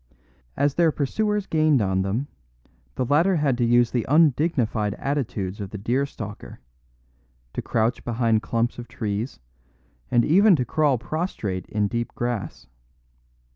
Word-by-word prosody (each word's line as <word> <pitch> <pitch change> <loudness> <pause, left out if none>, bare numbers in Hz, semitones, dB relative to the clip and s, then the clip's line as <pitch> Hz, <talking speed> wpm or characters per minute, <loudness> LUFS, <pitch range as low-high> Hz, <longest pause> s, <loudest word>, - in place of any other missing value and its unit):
As 145 -1 +2
their 170 0 +3
pursuers 210 +9 -1
gained 155 -5 +3
on 95 -3 +1
them, 100 +8 -1 0.7
the 130 - -1
latter 165 +9 +3
had 145 -5 +1
to - - +2
use 120 0 +3
the 120 -3 -1
undignified 135 - +2
attitudes 115 -9 -3
of 100 - -5
the 105 - -7
deer 125 +7 0
stalker, 105 -5 -9 0.9
to - - -3
crouch 115 +2 0
behind 115 -2 +1
clumps 115 +1 -1
of 120 - -8
trees 110 +2 -4 0.7
and 120 -1 +3
even 195 +5 +5
to 125 -5 -1
crawl 145 +1 +2
prostrate 120 - -4
in 105 -1 0
deep 120 +1 -3
grass. 120 -8 -4
120 Hz, 140 wpm, -24 LUFS, 110-150 Hz, 0.9 s, even